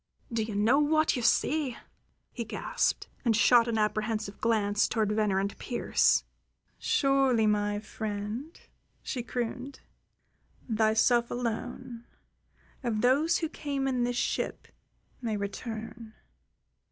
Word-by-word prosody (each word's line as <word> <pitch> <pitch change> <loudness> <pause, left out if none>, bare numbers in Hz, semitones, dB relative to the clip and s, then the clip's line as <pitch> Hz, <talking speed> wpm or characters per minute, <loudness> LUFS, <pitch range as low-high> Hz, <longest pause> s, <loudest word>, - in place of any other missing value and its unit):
"Do 230 - +1
you 215 -1 -3
know 225 +7 +4
what 310 +1 +3
you 250 - -2
say?" 270 +3 +1 0.5
he - - -4
gasped, - - -1 0.2
and 230 -4 +3
shot 235 +1 +5
an 230 -1 0
apprehensive 215 -1 -1
glance 210 -2 +2
toward 215 -3 0
Venner 210 -2 +1
and 200 +1 -2
Pearse. 240 - +2 0.6
"Surely, 270 -5 +3
my 205 -1 +1
friend," 215 +7 -5 0.4
she 250 - -3
crooned. 250 +3 -4 0.9
"Thyself 225 +1 +3
alone, 240 0 -4 0.8
of 225 -3 -1
those 285 +7 +3
who 325 - -1
came 280 -3 -3
in 255 -2 +1
this 245 0 -1
ship, - - -2 0.5
may 225 -3 -1
return. 220 +2 -6
230 Hz, 115 wpm, -29 LUFS, 215-255 Hz, 0.9 s, shot